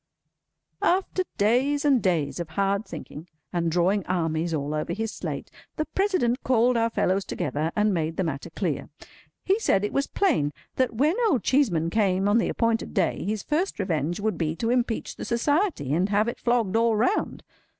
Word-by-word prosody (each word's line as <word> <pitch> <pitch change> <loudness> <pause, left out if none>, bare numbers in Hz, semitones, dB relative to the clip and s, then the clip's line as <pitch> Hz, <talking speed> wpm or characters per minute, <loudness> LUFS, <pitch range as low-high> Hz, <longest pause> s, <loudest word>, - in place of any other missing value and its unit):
After 370 0 +1
days 265 +8 +2
and 270 -5 +4
days 170 -5 0
of 170 -2 -4
hard 200 +5 0
thinking, 160 0 -9 0.3
and 170 -2 0
drawing 180 +4 +2
armies 165 -2 0
all 150 -1 -2
over 155 0 -2
his 225 +1 -3
slate, - - -6 0.2
the 310 - -1
President 360 -12 0
called 250 0 +3
our 230 0 +2
fellows 195 -3 +1
together, 150 +1 -2
and 210 -1 +2
made 165 -1 -2
the 190 - +1
matter 145 -5 -4
clear. - - -3 0.6
He 390 +3 +2
said 205 - +2
it - - -4
was 275 - +1
plain 250 - +1 0.2
that 255 -3 +1
when 295 - +2
Old 265 - +1
Cheeseman 180 - +2
came 195 -2 +2
on 210 +3 +4
the - - 0
appointed 230 0 0
day, 190 -5 +1
his 210 0 -2
first 335 +6 -1
revenge 175 -3 -1
would 215 +1 -1
be 160 -1 -1
to 230 +6 -1
impeach 245 -2 -1
the - - -6
Society, 285 - 0
and 180 +5 +1
have 210 +2 +2
it 235 - -4
flogged 235 -5 +1
all 230 0 +3
round. 250 - 0
210 Hz, 180 wpm, -25 LUFS, 170-250 Hz, 0.6 s, and